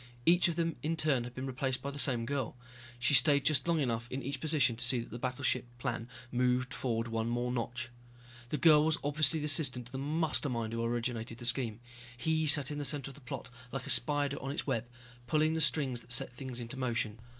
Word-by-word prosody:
Each 175 Hz, +2 st, +5 dB
of 170 Hz, -, -2 dB
them 165 Hz, -1 st, -1 dB
in 160 Hz, +4 st, -1 dB
turn 140 Hz, -6 st, +1 dB
had 125 Hz, 0 st, -9 dB
been 130 Hz, -, -4 dB
replaced 130 Hz, 0 st, -2 dB
by 140 Hz, -, -3 dB
the 140 Hz, -, -5 dB
same 120 Hz, -5 st, +3 dB
girl. 140 Hz, -1 st, -3 dB, 0.4 s
She 125 Hz, +4 st, +1 dB
stayed 140 Hz, +2 st, +6 dB
just 155 Hz, 0 st, +3 dB
long 170 Hz, -2 st, +2 dB
enough 120 Hz, -3 st, -2 dB
in 135 Hz, +1 st, -4 dB
each 140 Hz, 0 st, -3 dB
position 145 Hz, -6 st, +2 dB
to 120 Hz, -, -1 dB
see 125 Hz, +1 st, +4 dB
that 115 Hz, -, -7 dB
the 120 Hz, -, -6 dB
battleship 125 Hz, 0 st, -1 dB
plan 120 Hz, 0 st, -4 dB, 0.2 s
moved 125 Hz, 0 st, +1 dB
forward 115 Hz, -2 st, -2 dB
one 115 Hz, 0 st, -2 dB
more 120 Hz, +1 st, -1 dB
notch. 120 Hz, 0 st, -3 dB, 0.6 s
This 150 Hz, -, -2 dB
girl 155 Hz, -3 st, +7 dB
was 160 Hz, +1 st, +1 dB
obviously 150 Hz, +2 st, +1 dB
the -, -, -2 dB
assistant 135 Hz, -5 st, +2 dB
to 125 Hz, -, -11 dB
the 130 Hz, -, -5 dB
Mastermind 140 Hz, -6 st, 0 dB
who 115 Hz, 0 st, -2 dB
originated 115 Hz, -1 st, -3 dB
the 120 Hz, -, -5 dB
scheme. 120 Hz, -2 st, 0 dB, 0.4 s
He 160 Hz, +4 st, 0 dB
sat 145 Hz, -2 st, +5 dB
in 145 Hz, -, -4 dB
the -, -, -3 dB
center 140 Hz, -1 st, -1 dB
of -, -, -13 dB
the 140 Hz, -, -15 dB
plot, 125 Hz, 0 st, -7 dB, 0.2 s
like 135 Hz, -2 st, -4 dB
a -, -, +1 dB
spider 145 Hz, +2 st, +3 dB
on 135 Hz, -, -4 dB
its 140 Hz, -, -3 dB
web, 120 Hz, -4 st, -1 dB, 0.4 s
pulling 155 Hz, +4 st, +2 dB
the 160 Hz, -, -1 dB
strings 140 Hz, -5 st, +1 dB
that 125 Hz, -, -12 dB
set 125 Hz, 0 st, +2 dB
things 125 Hz, -1 st, -7 dB
into 120 Hz, +2 st, -6 dB
motion. 115 Hz, -4 st, -2 dB
130 Hz, 230 wpm, -32 LUFS, 120-145 Hz, 0.6 s, girl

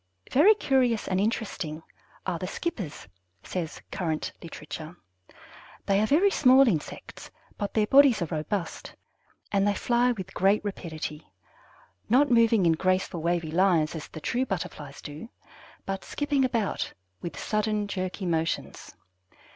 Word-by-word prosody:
Very 370 Hz, +11 st, +6 dB
curious 255 Hz, -, +1 dB
and 185 Hz, 0 st, +1 dB
interesting 190 Hz, -8 st, -2 dB, 0.4 s
are -, -, -2 dB
the -, -, -4 dB
Skippers, 210 Hz, -, -5 dB, 0.4 s
says 170 Hz, -4 st, -5 dB
Current 160 Hz, -4 st, -2 dB
Literature. 160 Hz, +1 st, -8 dB, 0.9 s
They 195 Hz, 0 st, +3 dB
are 215 Hz, -, +2 dB
very 360 Hz, -, +4 dB
small 265 Hz, -3 st, +6 dB
insects, 165 Hz, -10 st, -3 dB, 0.3 s
but 205 Hz, -2 st, -4 dB
their 215 Hz, -1 st, +3 dB
bodies 270 Hz, 0 st, +6 dB
are 160 Hz, -, -3 dB
robust, 165 Hz, +3 st, -4 dB, 0.6 s
and 200 Hz, 0 st, +2 dB
they 205 Hz, -, +2 dB
fly 240 Hz, +4 st, +2 dB
with 190 Hz, -4 st, -8 dB
great 200 Hz, +3 st, +2 dB
rapidity, 160 Hz, -, -6 dB, 0.8 s
not 260 Hz, +4 st, +4 dB
moving 230 Hz, -4 st, +4 dB
in 165 Hz, -, +5 dB
graceful, 185 Hz, 0 st, 0 dB
wavy 170 Hz, -1 st, 0 dB
lines 170 Hz, -3 st, +3 dB
as 160 Hz, -3 st, -6 dB
the -, -, -9 dB
true 245 Hz, -, 0 dB
Butterflies 150 Hz, -6 st, -5 dB
do, 150 Hz, +10 st, -8 dB, 0.6 s
but 195 Hz, 0 st, -3 dB
skipping 290 Hz, -2 st, 0 dB
about 230 Hz, -6 st, -1 dB, 0.3 s
with 170 Hz, -, -6 dB
sudden, 215 Hz, -1 st, 0 dB
jerky 185 Hz, 0 st, -4 dB
motions. 165 Hz, -2 st, -2 dB
195 Hz, 135 wpm, -27 LUFS, 165-235 Hz, 0.9 s, Very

